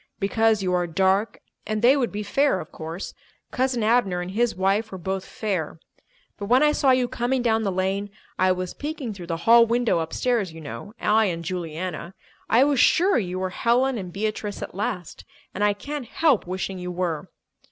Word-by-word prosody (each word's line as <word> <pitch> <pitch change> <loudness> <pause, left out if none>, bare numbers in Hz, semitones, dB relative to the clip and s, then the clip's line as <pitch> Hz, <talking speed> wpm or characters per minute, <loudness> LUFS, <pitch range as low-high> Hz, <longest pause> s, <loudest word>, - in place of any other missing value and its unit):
Because 220 +1 +2
you 180 -1 0
are 175 -1 +1
dark 190 +5 +1 0.3
and 215 +1 -2
they 255 +3 +7
would 255 -4 0
be 210 +1 -4
fair, 275 +1 +2
of - - -9
course; 165 +4 -6 0.4
Cousin 255 -2 0
Abner 215 -5 +2
and 180 +1 -5
his 235 +3 +1
wife 195 +4 +1
were 190 - -6
both 190 +2 -3
fair. 185 -9 -3 0.6
But 200 - -4
when 250 +6 +5
I 300 - +5
saw 285 -2 +2
you 255 -1 +4
coming 245 +2 -1
down 225 -2 +2
the 200 -3 0
lane—I 190 0 -1
was 185 0 -2
peeking 290 -6 -5
through 180 -3 -9
the 165 -1 -2
hall 230 0 +7
window 235 -5 +1
upstairs, 200 +4 -1
you 165 - -10
know, 155 - -8
I 220 +1 +3
and 170 -3 -3
Juliana—I 180 +6 -2
was 280 -2 +2
sure 360 +6 +4
you 185 -3 -3
were 185 0 -2
Helen 245 +4 +1
and 180 -2 -7
Beatrice 210 +1 -3
at - - -7
last. 195 -3 -4 0.3
And 205 - -2
I 205 0 +4
can't 280 +5 -6
help 285 - +2
wishing 185 +1 -4
you 180 0 -5
were!" 175 -3 -3
205 Hz, 190 wpm, -24 LUFS, 185-240 Hz, 0.6 s, they